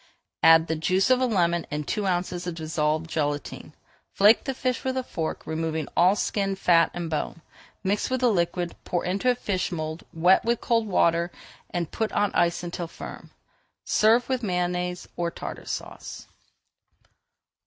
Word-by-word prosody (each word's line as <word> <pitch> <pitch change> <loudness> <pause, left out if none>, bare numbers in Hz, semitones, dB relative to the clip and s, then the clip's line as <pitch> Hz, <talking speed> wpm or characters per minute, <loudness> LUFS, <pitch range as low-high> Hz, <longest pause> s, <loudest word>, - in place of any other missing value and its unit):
Add 165 0 +7
the 160 - -1
juice 185 +8 +2
of 255 0 +4
a 255 - +3
lemon 175 -6 +1
and 150 0 -4
two 210 -2 -1
ounces 180 -1 -1
of 175 - -3
dissolved 155 0 -1
gelatine. 145 -2 -3 0.4
Flake 210 +3 +5
the 270 -1 -2
fish 255 -1 -1
with 260 0 -1
a 260 - 0
fork, 165 -9 -4
removing 160 -1 -2
all 180 +3 +5
skin, 195 -2 -1
fat, 170 -3 +4
and 175 -1 -3
bone, 160 +1 -3 0.4
mix 200 +2 0
with 260 -1 -1
the 245 -2 +4
liquid, 175 -2 -1
pour 175 - -2
into 195 +7 0
a 250 - +3
fish 200 -6 -2
mould, 155 -1 -4
wet 175 +4 +4
with 235 0 +1
cold 230 -2 +1
water, 170 -3 +2 0.4
and 170 -3 -3
put 220 -1 -2
on 205 -1 +2
ice 170 +1 +1
until 175 0 -4
firm. - - -10 0.5
Serve 225 +3 +3
with 260 -2 -1
Mayonnaise 180 -2 -2
or 170 -1 0
Tartar - - -8
Sauce. - - -6
180 Hz, 165 wpm, -26 LUFS, 165-205 Hz, 0.5 s, Add